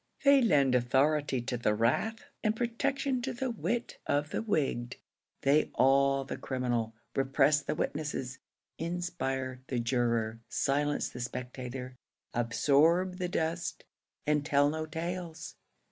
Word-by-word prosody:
They 280 Hz, -1 st, +7 dB
lend 145 Hz, -, +4 dB
authority 135 Hz, +2 st, +2 dB
to 125 Hz, 0 st, -3 dB
the 105 Hz, -3 st, +1 dB
wrath, 220 Hz, -, 0 dB, 0.2 s
and 215 Hz, -1 st, +2 dB
protection 260 Hz, +3 st, 0 dB
to 260 Hz, +2 st, -3 dB
the 250 Hz, +1 st, -2 dB
wit 235 Hz, +1 st, -2 dB
of 145 Hz, +1 st, 0 dB
the -, -, -1 dB
wigged. 145 Hz, -, -1 dB, 0.5 s
They 145 Hz, +3 st, +3 dB
awe 135 Hz, +1 st, +4 dB
the 135 Hz, -, -5 dB
criminal, 120 Hz, -4 st, -2 dB, 0.2 s
repress 135 Hz, +2 st, +3 dB
the 140 Hz, -, -3 dB
witnesses, 145 Hz, -5 st, -3 dB, 0.4 s
inspire 135 Hz, -7 st, -3 dB
the 130 Hz, -, -2 dB
juror, 115 Hz, -2 st, 0 dB
silence 145 Hz, +1 st, +1 dB
the 125 Hz, -, -9 dB
spectator, 125 Hz, +1 st, -6 dB, 0.4 s
absorb 150 Hz, +10 st, +3 dB
the 180 Hz, -1 st, -1 dB
dust, 165 Hz, +1 st, -2 dB, 0.4 s
and 150 Hz, -1 st, +2 dB
tell 145 Hz, 0 st, +3 dB
no 155 Hz, 0 st, -3 dB
tales. 165 Hz, 0 st, -5 dB
145 Hz, 130 wpm, -31 LUFS, 125-175 Hz, 0.5 s, They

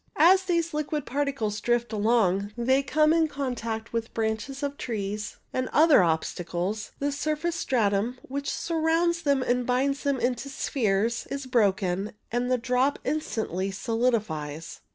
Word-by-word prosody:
As 370 Hz, +4 st, +6 dB
these 335 Hz, -3 st, 0 dB
liquid 300 Hz, -1 st, -2 dB
particles 260 Hz, -6 st, -2 dB
drift 240 Hz, -1 st, 0 dB
along 205 Hz, -2 st, +2 dB
they 260 Hz, +3 st, +3 dB
come 305 Hz, +3 st, +3 dB
in 325 Hz, -1 st, +3 dB
contact 235 Hz, -6 st, -4 dB
with 230 Hz, -1 st, -3 dB
branches 225 Hz, +5 st, -2 dB
of 285 Hz, 0 st, -2 dB
trees 210 Hz, -4 st, -4 dB, 0.2 s
and 255 Hz, 0 st, -1 dB
other 310 Hz, -, +6 dB
obstacles, 175 Hz, +5 st, -1 dB
the 285 Hz, +1 st, -1 dB
surface 310 Hz, +4 st, -1 dB
stratum 230 Hz, -5 st, +1 dB
which 280 Hz, +2 st, -4 dB
surrounds 335 Hz, +1 st, +1 dB
them 280 Hz, -4 st, +2 dB
and 250 Hz, 0 st, +1 dB
binds 265 Hz, +3 st, 0 dB
them 280 Hz, -2 st, 0 dB
into 250 Hz, +2 st, -1 dB
spheres 230 Hz, -6 st, 0 dB
is 275 Hz, -1 st, -4 dB
broken, 200 Hz, -5 st, +1 dB, 0.2 s
and 245 Hz, +1 st, 0 dB
the 255 Hz, -, +3 dB
drop 250 Hz, +4 st, +1 dB
instantly 220 Hz, -, -2 dB
solidifies. 195 Hz, -9 st, -2 dB
250 Hz, 140 wpm, -27 LUFS, 215-285 Hz, 0.2 s, As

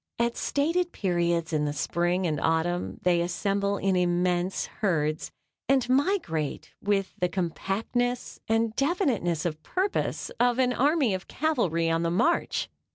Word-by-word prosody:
At 235 Hz, 0 st, +1 dB
stated 340 Hz, +5 st, 0 dB
periods 170 Hz, -3 st, 0 dB
in 150 Hz, -1 st, +1 dB
the 145 Hz, -, -1 dB
spring 175 Hz, +5 st, 0 dB
and 155 Hz, -4 st, 0 dB
autumn 170 Hz, +2 st, 0 dB
they 175 Hz, -1 st, +3 dB
assemble 200 Hz, +3 st, 0 dB
in 195 Hz, -1 st, +1 dB
immense 180 Hz, +1 st, +1 dB, 0.2 s
herds 155 Hz, -6 st, 0 dB, 0.4 s
and 270 Hz, -3 st, +3 dB
migrate 255 Hz, -, 0 dB
with 200 Hz, -1 st, 0 dB
the 180 Hz, -, +1 dB
compactness 200 Hz, +7 st, -2 dB
and 225 Hz, 0 st, +1 dB
definiteness 270 Hz, -, 0 dB
of 155 Hz, -2 st, -2 dB
purpose 380 Hz, -, -1 dB
of 245 Hz, 0 st, +3 dB
an 250 Hz, -1 st, +2 dB
army 280 Hz, -, +2 dB
of 185 Hz, 0 st, -4 dB
cavalry 200 Hz, -, 0 dB
on 165 Hz, 0 st, +1 dB
the 170 Hz, -, +1 dB
march. 255 Hz, -, +1 dB
190 Hz, 140 wpm, -27 LUFS, 170-245 Hz, 0.4 s, they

